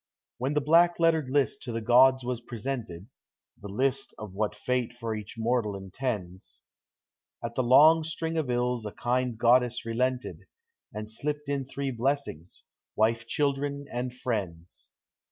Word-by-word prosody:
When 135 +4 -1
the 150 - +3
black 170 +4 +4
lettered 160 -5 +2
list 140 0 +1
to 120 - -5
the 115 - -2
gods 130 +3 +5
was 125 -1 -3
pre 120 0 -8
sented 110 -8 -4 0.6
(The 105 - -7
list 135 +6 -1
of 105 -3 -8
what 105 +1 -1
Fate 125 +2 -1
for 115 -2 -4
each 105 -2 -7
mortal 115 -2 0
intends), 95 -2 -5 0.8
At - - -4
the - - 0
long 155 +6 +6
string 160 +1 -3
of 155 -5 -1
ills 125 -1 0
a 105 - -6
kind 125 -1 -1
goddess 120 +1 +3
relented, 125 +2 -2 0.4
And 105 0 -6
slipped 145 +6 -4
in 140 -2 -1
three 140 0 -3
blessings, 120 - -3 0.2
— - - -64
wife, 115 +1 +1
children, 140 +1 -1
and 125 +1 -3
friends. 100 -9 -5
125 Hz, 155 wpm, -28 LUFS, 110-135 Hz, 0.8 s, long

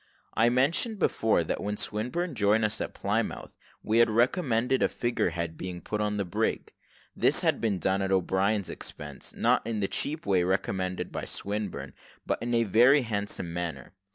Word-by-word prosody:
I 115 +2 +4
mentioned 155 - +1
before, 110 - +2
that - - -3
when 105 0 -3
Swinburne 125 +12 -2
joined 105 +2 +3
us 105 - -1
at - - -4
Plymouth, - - -2 0.4
he 110 +2 +3
had 120 - +5
recommended 125 - +2
a - - +3
figure 120 -6 0
head 85 -1 -4
being 90 -1 -5
put 105 +4 -3
on 105 0 0
the 100 - -1
brig. 85 - -2 0.4
This - - +4
had - - +1
been 110 -4 +1
done 95 +2 0
at 95 0 -1
O'Brien's 95 +2 +1
expense 75 -2 -7
not - - +3
in 115 -2 -2
the 100 - 0
cheap 155 +9 -2
way 95 -3 +3
recommended 95 0 -1
by - - -4
Swinburne, 105 -1 -4 0.3
but - - -1
in 120 0 -1
a 115 - +3
very 120 +7 +5
handsome 100 -6 -3
manner. 85 0 -5
105 Hz, 180 wpm, -28 LUFS, 95-120 Hz, 0.4 s, had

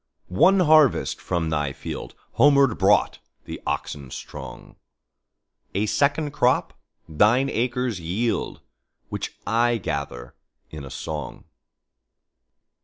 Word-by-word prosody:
One 185 - +4
harvest 155 -5 +4
from 80 -2 -2
thy 75 -3 -1
fieldHomeward 140 - +1
brought 100 +1 +3 0.3
the - - -7
oxen 70 -3 -4
strong;A 65 - -9
second 145 +6 +1
crop 125 -3 +1 0.3
thine 110 - +3
acres 120 -3 -1
yield, 100 +8 -2 0.5
Which - - -5
I 120 +2 +2
gather 70 - -5 0.4
in 75 -2 -8
a 65 - -8
song. 75 +2 -6
105 Hz, 95 wpm, -24 LUFS, 75-130 Hz, 0.5 s, One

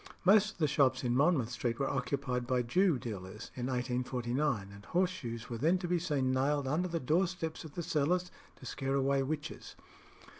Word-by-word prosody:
Most 210 +2 +5
of - - -25
the 155 -3 +2
shops 135 -3 +2
in 120 -1 +1
Monmouth 140 -4 +3
Street 120 -2 -2
were 135 - 0
occupied 125 -2 -1
by 125 -1 +1
Jew 175 +5 +3
dealers 105 -3 -7
in 125 -1 -3
1849, 125 -2 -1
and 100 0 -12
horse 180 +1 +1
shoes 115 -10 -6
were 115 -2 -5
then 165 +8 +3
to 180 -1 -4
be 175 0 +1
seen 145 -6 0
nailed 135 +2 +1
under 160 +7 +1
the 170 -1 -2
door 160 +7 +2
steps 165 -3 -5
of 155 -3 -11
the 175 - -3
cellars 175 +5 +1 0.2
to - - -14
scare 135 +2 -2
away 140 0 +2
witches. 150 +3 -4
135 Hz, 195 wpm, -32 LUFS, 125-165 Hz, 0.2 s, Most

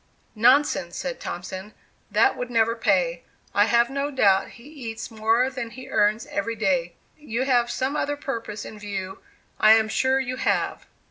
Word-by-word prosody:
"Nonsense," 235 -6 +3
said 265 -1 -4
Thompson 185 +3 -7 0.3
"that 400 - +3
would 250 -1 -5
never 230 -1 +2
pay; - - +1 0.3
I - - +4
have 235 0 +3
no 280 +1 -1
doubt 200 -9 +3
he 235 - -15
eats 245 -6 -7
more 225 +3 +2
than 250 -3 -5
he 255 +2 -11
earns 215 +1 +2
every 230 +3 -3
day; 185 -5 0 0.2
you 255 -4 -2
have 245 -3 +2
some 265 +4 -2
other 290 -1 -1
purpose 230 -7 -5
in 215 - -9
view, 195 -2 -5 0.4
I 215 0 +7
am 220 0 +3
sure 260 +5 +2
you 255 -1 -3
have." - - -1
230 Hz, 165 wpm, -24 LUFS, 215-260 Hz, 0.4 s, I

